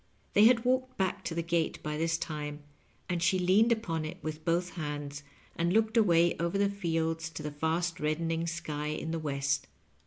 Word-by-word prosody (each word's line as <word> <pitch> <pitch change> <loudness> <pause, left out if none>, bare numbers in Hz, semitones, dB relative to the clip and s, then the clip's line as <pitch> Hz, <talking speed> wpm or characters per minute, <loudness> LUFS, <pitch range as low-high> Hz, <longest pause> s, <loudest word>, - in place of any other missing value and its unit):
They 210 - +7
had 235 0 +5
walked 255 0 +1
back 190 -1 -1
to 165 - -3
the 170 - -1
gate 170 -1 0
by 150 0 -2
this 165 +1 +1
time, 150 -2 -5 0.4
and 175 -2 -1
she 175 +2 +3
leaned 190 +6 +4
upon 180 -9 0
it 155 +3 -5
with 155 0 -5
both 175 +1 +1
hands, 145 -3 -5 0.3
and 170 +1 +1
looked 220 +3 +2
away 175 -6 +4
over 170 +3 0
the 200 0 +2
fields 165 -4 -1
to 160 -1 -7
the 150 - -3
fast 160 +3 -1
reddening 165 +2 -1
sky 155 -3 -3
in 155 +1 -3
the 165 - -1
west. 140 -2 -1
165 Hz, 190 wpm, -30 LUFS, 155-185 Hz, 0.4 s, They